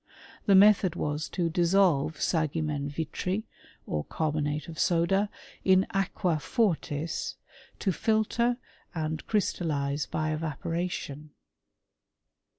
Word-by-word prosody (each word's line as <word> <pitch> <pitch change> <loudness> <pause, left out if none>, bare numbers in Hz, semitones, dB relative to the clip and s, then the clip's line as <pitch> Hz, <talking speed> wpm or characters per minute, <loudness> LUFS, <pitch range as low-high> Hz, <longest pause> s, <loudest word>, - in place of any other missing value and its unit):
The 200 - +6
method 195 -3 +6
was 150 -1 -2
to 175 -3 0
dissolve 170 -3 +3
sagimen 155 -2 -1
vitri, 165 +7 -2 0.4
or 75 -1 -2
carbonate 150 -1 -1
of 165 -2 -8
soda, 195 +4 +2 0.3
ia 190 0 +5
aqua 185 -4 0
fortis, 165 - -1 0.4
to 195 - 0
filter 225 +5 +1 0.4
and 155 -2 -2
crystallize 150 -8 0
by 155 0 -1
evaporation. 155 -1 -3
165 Hz, 95 wpm, -28 LUFS, 150-190 Hz, 0.4 s, The